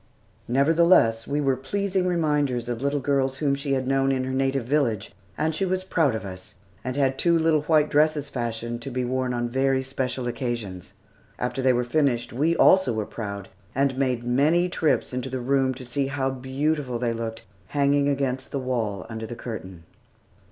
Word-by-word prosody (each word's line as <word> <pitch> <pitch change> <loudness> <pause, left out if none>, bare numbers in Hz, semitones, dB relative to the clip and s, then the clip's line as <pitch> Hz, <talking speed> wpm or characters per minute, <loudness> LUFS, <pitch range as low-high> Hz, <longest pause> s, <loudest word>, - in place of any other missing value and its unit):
Nevertheless, 140 -4 +4
we 145 +1 0
were 135 -2 +2
pleasing 190 +7 -1
reminders 150 -8 0
of 120 -1 -3
little 140 +1 0
girls 135 -1 0
whom 140 -2 +1
she 140 0 -1
had 130 -1 0
known 135 0 +2
in 130 -1 0
her 130 0 -3
native 135 0 0
village, 125 -7 0 0.3
and 155 +1 0
she 175 - -1
was 185 0 0
proud 160 -9 +1
of 110 - -5
us, 95 -1 -8 0.3
and 130 0 -3
had 135 -1 +1
two 170 -1 +3
little 160 -2 +3
white 150 0 +3
dresses 150 -1 +2
fashioned 120 -1 -4
to 135 - -5
be 125 -1 -2
worn 130 0 -1
on 120 -1 -1
very 130 +2 +1
special 130 -1 -3
occasions. 120 -7 -4 0.4
After 125 +2 -2
they 130 0 +4
were 125 0 +1
finished, 125 -3 0
we 155 +7 +2
also 185 -7 +5
were 110 -1 -2
proud, 100 -3 -6 0.3
and 135 0 +2
made 130 -3 0
many 150 +9 +2
trips 160 -6 0
into 125 +1 -3
the 130 0 -3
room 135 +1 +2
to 130 0 -9
see 135 +3 -1
how 135 -1 -1
beautiful 135 0 -1
they 120 -1 -1
looked 115 -1 -5 0.2
hanging 140 0 +2
against 135 -2 -1
the - - -3
wall 115 -7 -2
under 110 -1 -6
the 120 - -6
curtain. 95 -8 -7
130 Hz, 185 wpm, -25 LUFS, 120-145 Hz, 0.4 s, also